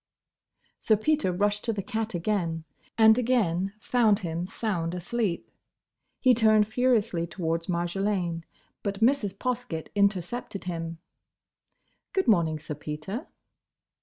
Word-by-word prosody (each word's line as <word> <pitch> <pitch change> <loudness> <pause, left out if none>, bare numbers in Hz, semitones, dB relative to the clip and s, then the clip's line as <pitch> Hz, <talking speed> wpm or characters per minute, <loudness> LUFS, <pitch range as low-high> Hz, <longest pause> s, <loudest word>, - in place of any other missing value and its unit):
Sir 215 - +3
Peter 300 -2 +1
rushed 205 +3 0
to 230 - +1
the 200 -2 -3
cat 225 -3 -3
again, 170 -3 -1 0.3
and 220 +1 +7
again 195 -7 +1
found 220 -2 +3
him 170 +2 -3
sound 180 -6 -2
asleep. 180 +1 -2 0.7
He 255 -2 +5
turned 215 -2 +4
furiously 225 -7 +1
towards 165 0 -2
Marjolaine, 175 -1 -1 0.4
but 200 0 -3
Mrs. 225 -5 +2
Poskett 245 -11 -3
intercepted 200 +1 0
him. 165 -2 -4 1.2
"Good 380 -1 +1
morning, 170 -8 +3
Sir 150 0 -6
Peter!" 150 - -6
200 Hz, 115 wpm, -27 LUFS, 170-225 Hz, 1.2 s, and